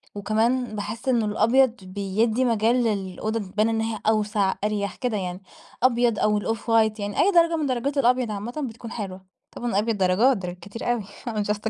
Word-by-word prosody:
وكمان 220 +4 0
باحس 215 +4 -5
إنه 235 -4 +2
الأبيض 230 +4 +3
بيدي 205 +6 0
مجال 230 0 +2
للأوضة 215 +1 -2
تبان 210 +3 0
إن 225 0 0
هي 225 -1 -2
أوسع 210 -2 +2
أريح 200 -2 -1
كده 245 -5 -2
يعني 180 0 -4 0.4
أبيض 240 -3 +3
أو 210 0 +2
ال 205 - -4
off - - -14
white 220 -2 +2
يعني 205 0 -3
أي 400 - +5
درجة 335 -1 +4
من 310 - -1
درجات 270 +2 -1
الأبيض 250 -3 +2
عامةً 240 +8 -4
بتكون 230 +1 -10
حلوة. 190 -4 -6 0.3
طبعًا 240 - -4
الأبيض 215 +1 0
درجات، 195 +7 +3
درجات 180 -1 -6
كتير 230 +4 -4
أوي 235 -4 -1 0.3
I'm 210 -2 -1
just 215 +2 -4
220 Hz, 185 wpm, -24 LUFS, 205-240 Hz, 0.4 s, أي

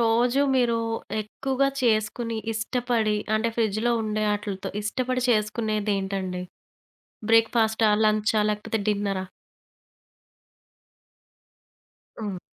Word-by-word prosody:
రోజు 240 +3 +3 0.2
మీరు 235 -2 +2 0.4
ఎక్కువగా 270 +5 -1
చేసుకుని 230 0 +1 0.2
ఇష్టపడి 225 -1 0 0.2
అంటే 225 +2 +1
ఫ్రిడ్జ్‌లో 225 +1 +1
ఉండే 215 0 -1
అటిలతో, 205 -2 -4
ఇష్టపడి 255 +4 -1
చేసుకునేదేంటండి? 205 -4 -1 0.9
బ్రేక్‌ఫస్టా, 225 -1 +4 0.2
లంచా 215 0 +2
లేకపోతే 210 +1 -2
డిన్నరా? 200 -2 -1 2.9
హ్మ్. 205 -4 -4
220 Hz, 75 wpm, -25 LUFS, 210-235 Hz, 2.9 s, బ్రేక్‌ఫస్టా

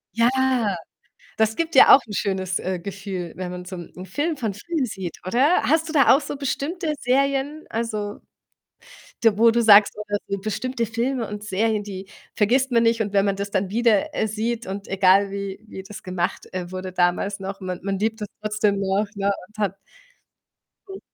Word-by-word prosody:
Ja, 230 +1 +4 1.1
das 220 0 +2
gibt 330 0 -2
dir 265 - +8
auch - - +10
'n 205 - -7
schönes, 190 -2 -1
äh, 185 -1 -3
Gefühl, 195 -2 -6
wenn 180 -1 -5
man 180 0 -7
so 185 - -7
'nen 180 +2 -9
Film 295 - -2
von 220 -5 -2
früher 295 - -2
sieht, 190 -6 -6
oder? 260 - +3
Hast 320 +2 +2
du - - -5
da 275 -2 +6
auch 290 - +1
so 290 - -5
bestimmte 300 +4 -2
Serien, 275 +4 0
also, 215 -2 -3 1.0
da 220 -3 +4
wo 230 +1 +6
du 235 +1 +1
sagst 210 -2 +7
oder 205 -1 -2
so 200 0 -2
bestimmte 230 +4 -2
Filme 235 +1 -2
und 210 0 -7
Serien, 210 +2 0
die 195 -1 -7 0.3
vergisst 255 +5 +2
man 230 0 +4
nicht. 230 -1 +3
Und 205 -1 -4
wenn 200 0 +3
man 195 -1 0
das 200 0 -4
dann 190 -1 0
wieder, 225 -2 +2
äh, - - 0
sieht 225 +2 -3
und 195 +1 -6
egal 195 +1 +4
wie 200 0 -5
wie 190 - -8
das 200 +1 -10
gemacht, 180 -1 -3
äh, 180 -1 -5
wurde 185 0 -5
damals 180 +3 0
noch, 195 +1 -6
man 185 -1 -5
man 195 -1 -2
liebt 220 +1 -1
das 210 - -4
trotzdem 215 -1 +1
noch, 195 +2 +1
ne, 200 0 +1 0.2
und 215 0 -23
hat 195 -1 -1 1.1
Mhm. 390 0 -8
210 Hz, 195 wpm, -23 LUFS, 195-235 Hz, 1.1 s, auch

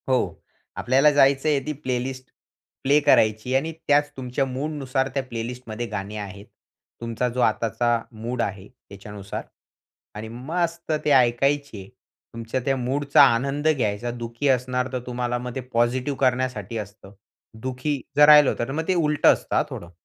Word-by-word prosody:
हो. 130 -1 0 0.4
आपल्याला 135 +4 +4
जायचंय 140 +1 +3
ती 155 - -2
प्लेलिस्ट 130 0 -3 0.6
प्ले 140 +2 +4
करायची 110 -3 +3
आणि 150 +5 0 0.2
त्याच 145 0 +3
तुमच्या 130 +1 -2
मूडनुसार 135 0 -2
त्या 135 -1 -1
प्लेलिस्टमध्ये 120 -1 -6
गाणी 105 -1 -5
आहेत. 100 -1 -8 0.6
तुमचा 115 +1 -2
जो 125 - -1
आताचा 120 0 +1
मूड 120 +2 -4
आहे 100 -2 -4
त्याच्यानुसार 100 -4 -9 0.7
आणि 110 +1 -6
मस्त 165 +7 -3
ते 150 - +2
ऐकायचे. 130 -3 +2 0.5
तुमच्या 115 +2 -3
त्या 135 - +2
मूडचा 140 +3 +2
आनंद 140 +5 -1
घ्यायचा. 120 -6 0
दुःखी 120 +3 -4
असणार, 125 0 +1
तर 130 - -1
तुम्हाला 120 0 -2
मग 125 0 -6
ते 130 - -3
पॉझिटिव्ह 125 +4 0
करण्यासाठी 125 -5 0
असतं. 105 -1 -9 0.5
दुःखी 130 +3 -3 0.2
जर 150 - +8
राहिलं 150 -2 +8
होतं, - - -2
तर 130 - -6
मग 160 +3 -3
ते 185 - +3
उलटं 150 -3 +4
असतं - - -5
हां - - +3
थोडं. 85 0 -8
125 Hz, 150 wpm, -24 LUFS, 115-140 Hz, 0.7 s, जर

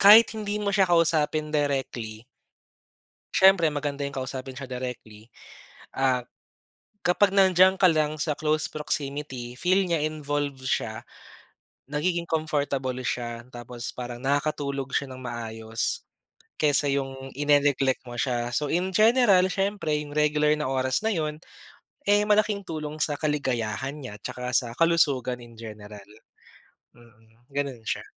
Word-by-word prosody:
kahit 215 +3 +9
hindi 210 -1 -3
mo 200 - 0
siya 195 -2 +3
kausapin 155 -2 +2
directly 130 -6 -2 1.1
siyempre 190 -4 +6
maganda 145 -1 -3
yung 140 0 -3
kausapin 130 0 -5
siya 135 - -6
directly, 120 -3 -7 0.7
ah, 130 -2 +1 0.8
kapag 185 +3 +4
nandiyan 190 0 +5
ka 185 - +4
lang 155 -1 +1
sa 150 +1 -1
close 155 +1 0
proximity 140 -4 -4
feel 185 +2 +3
nya 165 -4 0
involved 145 -3 -2
siya, 110 -4 -1 0.9
nagiging 170 +3 -1
comfortable 145 -5 -1
siya 120 -1 -3
tapos 120 -1 -7
parang 120 -1 -6
nakakatulog 140 -1 -1
siya 140 - 0
ng 130 - -8
maayos 115 -2 -3 0.6
kaysa 145 -1 +3
yung 135 -1 -3
ine-neglect 140 -2 +2
mo 120 - -8
siya. 120 -2 -1
So 150 +2 0
in 185 +3 0
general, 215 -4 +5
siyempre 195 -5 -1
yung 145 -1 -6
regular 150 0 +3
na 150 - -1
oras 130 -1 +1
na 220 - +1
yun 155 -2 -2 0.7
eh, 205 0 +5
malaking 210 -1 +2
tulong 155 -3 -5
sa 145 -2 0
kaligayahan 135 -4 -1
niya 130 -7 -8
'tsaka 125 0 -4
sa 120 - +1
kalusugan 140 -7 +2
in 120 - -15
general. 105 -2 -10 0.8
Mm, 115 -1 -22 0.2
ganun 140 -4 -2
siya. - - -2
145 Hz, 130 wpm, -26 LUFS, 125-160 Hz, 1.1 s, kahit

